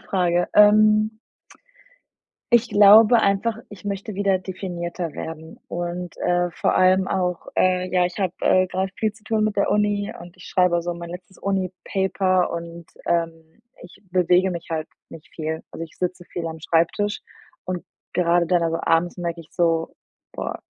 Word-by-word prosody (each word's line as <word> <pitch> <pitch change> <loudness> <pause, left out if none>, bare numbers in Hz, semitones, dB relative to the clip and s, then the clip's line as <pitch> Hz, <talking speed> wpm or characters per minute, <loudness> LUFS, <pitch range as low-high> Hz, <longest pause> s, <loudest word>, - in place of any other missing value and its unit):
Frage. 175 -2 0
Ähm 215 +1 +5 1.4
ich 235 0 +4
glaube 210 +3 +7
einfach, 200 +3 +1
ich 205 -1 -11
möchte 200 +1 -4
wieder 195 -1 +1
definierter 175 -3 -5
werden 160 0 -8
und, 175 +1 -4
äh, 175 0 +1
vor - - 0
allem 185 +1 +4
auch, 180 -2 -1
äh 185 0 +2
ja, 180 -1 +3
ich 180 +2 -3
habe, 185 -3 -1
äh, 185 0 +4
grad 190 +1 -2
viel 220 - 0
zu 220 -1 -21
tun 220 -3 0
mit 215 -1 -1
der 200 - +1
Uni 205 -1 +1
und 175 +1 -12
ich 180 - -14
schreibe 180 -2 +2
so 175 +1 -2
mein 170 0 -8
letztes 180 +2 -10
Uni-Paper 190 0 0
und, 170 0 -7 0.2
ähm, 165 +3 -2 0.2
ich 175 +3 -15
bewege 180 +1 +3
mich 170 -1 -6
halt 160 -1 -3 0.2
nicht 160 - -13
viel. 160 0 -4
Also, 165 - -7
ich 160 - -9
sitze 180 -1 -3
viel 170 -1 -5
am 160 0 -6
Schreibtisch 170 +6 0 0.4
und 180 -1 -4 0.3
grade 175 -1 +2
dann 175 0 +2
also, 165 0 0
abends 165 +2 +1
merke 170 -1 -4
ich 160 - -15
so: 165 -2 0 0.4
„Boah, - - -5
180 Hz, 165 wpm, -23 LUFS, 170-195 Hz, 1.4 s, glaube